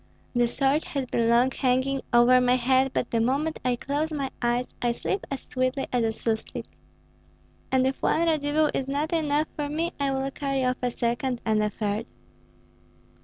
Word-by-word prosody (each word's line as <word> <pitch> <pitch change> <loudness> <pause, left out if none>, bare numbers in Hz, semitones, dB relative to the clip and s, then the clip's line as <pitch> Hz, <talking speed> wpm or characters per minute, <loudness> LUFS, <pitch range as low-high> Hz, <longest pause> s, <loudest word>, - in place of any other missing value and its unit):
The 240 -1 +3
sword 275 +5 +1
has 275 -2 -3
been 230 -2 0
long 240 +3 +4
hanging 260 +1 +1
over 245 +1 +6
my 250 0 +4
head, 260 +1 +3
but 245 - -2
the 230 - +2
moment 280 +7 0
I 250 -1 +1
close 290 +6 -2
my 275 -3 -3
eyes 240 +1 0
I 240 -1 +1
sleep 390 +10 -3
as 275 -2 -5
sweetly 255 +1 -1
as 245 -2 +2
a - - +2
suslik. 220 0 -2 1.1
And 260 -1 +3
if 265 0 -1
one 330 +2 +2
Radzivill 305 -1 +2
is 265 - -2
not 295 +5 -1
enough 305 -1 +1
for 295 -2 -3
me, 325 +3 -2
I 280 -1 +1
will 270 0 -1
carry 275 -2 -1
off 250 0 +1
a 250 - +1
second, 240 +2 -1
and 215 -1 +2
a 210 - +1
third." 210 +2 -3
260 Hz, 185 wpm, -26 LUFS, 240-285 Hz, 1.1 s, over